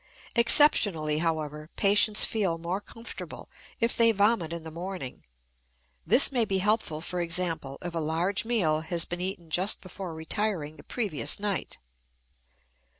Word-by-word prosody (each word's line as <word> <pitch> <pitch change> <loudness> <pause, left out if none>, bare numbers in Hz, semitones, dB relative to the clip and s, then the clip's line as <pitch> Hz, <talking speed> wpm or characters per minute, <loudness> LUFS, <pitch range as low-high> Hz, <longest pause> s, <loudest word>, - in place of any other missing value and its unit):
Exceptionally, 205 - +4
however, 155 -2 -3
patients 210 +1 +4
feel 195 -7 -1
more 175 +4 -3
comfortable 230 +2 -9 0.3
if 230 +1 +1
they 230 -1 +5
vomit 205 -5 +1
in 170 -1 -6
the 160 - -8
morning; 175 -5 -6 0.8
this 275 - +6
may 245 -3 +2
be 195 -3 0
helpful, 190 -5 0
for 180 +1 -3
example, 165 -5 -2
if 175 -1 -5
a 165 - -2
large 165 +5 0
meal 195 -10 +1
has 170 +1 +1
been 175 0 -5
eaten 180 -3 -4
just 185 +6 +1
before 185 -2 -8
retiring 160 -2 -2
the - - -13
previous 190 - -1
night. 200 -2 -3
180 Hz, 145 wpm, -27 LUFS, 160-210 Hz, 0.8 s, this